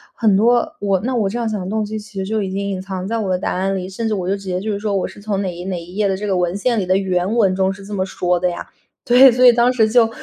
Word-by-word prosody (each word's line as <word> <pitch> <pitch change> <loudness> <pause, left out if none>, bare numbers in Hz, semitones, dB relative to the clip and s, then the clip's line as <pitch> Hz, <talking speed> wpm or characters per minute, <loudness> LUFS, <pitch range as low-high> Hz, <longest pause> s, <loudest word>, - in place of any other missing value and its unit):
很 215 -4 +3
多 240 +8 +2
我 195 -2 0
那 255 +5 -2
我 220 -4 +1
这 225 - -4
样 235 -2 -1
想 215 -1 -3
的 180 - -5
动 215 +1 -1
机， 215 +1 -4
其 210 -1 -13
实 190 - -2
就 215 +2 -1
已 195 - -3
经 200 +1 -3
隐 190 -2 -3
藏 190 -1 -5
在 230 +2 -1
我 210 -4 -2
的 185 - +1
答 180 - -2
案 190 +1 -1
里， 185 -1 -4
甚 225 +4 -4
至 220 - -1
我 185 -3 -2
就 200 - 0
直 195 - -13
接 185 -1 -3
就 215 +2 -3
是 200 - -3
说， 205 -1 -2
我 190 - 0
是 205 - -13
从 200 -1 -2
哪 185 -3 -3
一 175 +1 -8
哪 190 -1 -3
一 175 +2 -12
页 210 0 +1
的 195 - 0
这 205 +2 -5
个 195 -2 0
文 180 0 0
献 230 +3 0
里 190 - -1
的 185 +1 +2
原 190 +1 -1
文 200 -5 +3
中， 190 0 +1
是 195 0 -12
这 210 - -8
么 190 -2 -1
说 180 -1 -1
的 180 +1 +1
呀， 175 - -6 0.4
对， 255 +2 +7
所 250 +2 +3
以 245 - +10
当 240 +1 +3
时 220 -3 +2
就 225 0 +4
200 Hz, 370 characters per minute, -19 LUFS, 185-220 Hz, 0.4 s, 以